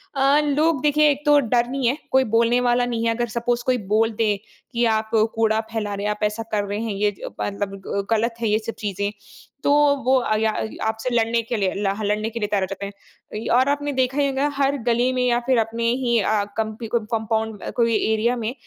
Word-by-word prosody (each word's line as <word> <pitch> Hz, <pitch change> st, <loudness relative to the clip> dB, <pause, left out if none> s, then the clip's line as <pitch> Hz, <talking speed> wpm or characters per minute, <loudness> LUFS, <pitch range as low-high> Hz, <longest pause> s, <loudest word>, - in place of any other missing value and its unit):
अ, 275 Hz, +2 st, +4 dB
लोग 295 Hz, 0 st, +1 dB
देखिए 300 Hz, 0 st, +4 dB
एक 280 Hz, 0 st, -3 dB
तो 295 Hz, -1 st, +6 dB
डर 240 Hz, -1 st, +1 dB
नहीं 265 Hz, -2 st, -1 dB
है, 260 Hz, -, +1 dB
कोई 265 Hz, 0 st, +4 dB
बोलने 235 Hz, +2 st, +3 dB
वाला 245 Hz, 0 st, +2 dB
नहीं 230 Hz, -1 st, -2 dB
है। 230 Hz, -, +2 dB
अगर 240 Hz, 0 st, -1 dB
सपोज़ 240 Hz, 0 st, 0 dB
कोई 255 Hz, -1 st, +2 dB, 0.2 s
बोल 225 Hz, +1 st, +3 dB
दे 210 Hz, -1 st, +2 dB, 0.4 s
कि 235 Hz, 0 st, +1 dB
आप 220 Hz, 0 st, -2 dB, 0.3 s
कूड़ा 220 Hz, -1 st, +2 dB
फैला 215 Hz, -2 st, -2 dB
रहे 200 Hz, +1 st, -4 dB
हैं, 210 Hz, -, +1 dB
आप 210 Hz, 0 st, -5 dB
ऐसा 210 Hz, +2 st, -1 dB
कर 210 Hz, -1 st, +1 dB
रहे 205 Hz, +1 st, -3 dB
हैं 225 Hz, -2 st, -2 dB
ये 205 Hz, +1 st, +1 dB
ज -, -, -7 dB, 0.4 s
मतलब 195 Hz, 0 st, -10 dB, 0.3 s
गलत 230 Hz, +1 st, +1 dB
है 230 Hz, -, +1 dB
ये 210 Hz, -, +3 dB
सब 225 Hz, +1 st, -6 dB
चीज़ें 200 Hz, -1 st, -2 dB, 0.5 s
तो -, -, +3 dB, 0.3 s
वो 260 Hz, +1 st, +4 dB
आगया 220 Hz, -2 st, +1 dB, 0.4 s
आपसे 220 Hz, +3 st, -2 dB
लड़ने 230 Hz, 0 st, +2 dB
के 235 Hz, -, +1 dB
लिए 195 Hz, 0 st, -1 dB
हाँ 205 Hz, +2 st, -2 dB
ल -, -, 0 dB
लड़ने 210 Hz, +1 st, 0 dB
के 230 Hz, +1 st, -6 dB
लिए 210 Hz, -, -1 dB
तैयार 205 Hz, -2 st, 0 dB
हो 190 Hz, -, -1 dB
जाते 195 Hz, +1 st, -5 dB
हैं। 200 Hz, +2 st, -9 dB
और 260 Hz, +2 st, +3 dB
आपने 290 Hz, 0 st, -1 dB
देखा 260 Hz, +1 st, 0 dB
ही 285 Hz, -, +3 dB
होगा 275 Hz, +1 st, 0 dB
हर 280 Hz, 0 st, +2 dB
गली 240 Hz, +2 st, +2 dB
में 255 Hz, -, 0 dB
या 240 Hz, -1 st, +2 dB
फिर 260 Hz, -2 st, +3 dB
अपने 225 Hz, +1 st, -2 dB, 0.2 s
ही 235 Hz, -1 st, +2 dB
अ, 210 Hz, 0 st, +1 dB
कंप 220 Hz, -1 st, -2 dB, 0.2 s
कंपाउंड 220 Hz, -1 st, -2 dB
कोई 230 Hz, -2 st, +2 dB, 0.2 s
एरिया 230 Hz, +3 st, +1 dB
में 235 Hz, -, -2 dB
230 Hz, 230 wpm, -22 LUFS, 215-255 Hz, 0.5 s, तो